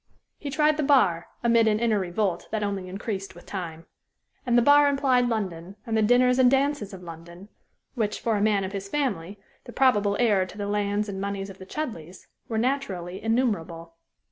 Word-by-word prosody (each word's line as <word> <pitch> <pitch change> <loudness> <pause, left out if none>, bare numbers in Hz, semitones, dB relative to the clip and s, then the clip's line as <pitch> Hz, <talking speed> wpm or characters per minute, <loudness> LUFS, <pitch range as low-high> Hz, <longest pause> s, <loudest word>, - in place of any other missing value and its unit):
He 285 - -5
tried 300 +1 +2
the - - 0
bar, 205 - +3 0.2
amid 230 -1 +4
an 215 -1 +2
inner 225 -3 +2
revolt 185 0 -2
that 215 -1 -2
only 195 -2 -3
increased 195 0 -5
with 175 - -14
time. 170 -4 -6 0.6
And 240 0 +3
the - - +6
bar 290 +2 +6
implied 265 -3 +2
London, 190 -5 -4
and 225 -2 -2
the 220 - +3
dinners 250 +3 +4
and 255 -1 +6
dances 270 -5 0
of 185 -2 -10
London, 170 +3 -11 0.4
which, 215 -4 -2
for 225 -2 0
a 205 - 0
man 205 -2 +2
of 190 - -4
his 195 -1 -6
family, 205 - -2 0.3
the 240 - -9
probable 210 -6 +2
heir 205 -6 +3
to 200 - -12
the 205 - -3
lands 205 0 -1
and 195 -1 -5
moneys 200 0 -4
of 190 - -15
the 190 - -11
Chudleighs, 190 - -6 0.2
were 225 - -3
naturally 205 -8 -2
innumerable. 190 -8 -1
210 Hz, 195 wpm, -25 LUFS, 190-245 Hz, 0.6 s, the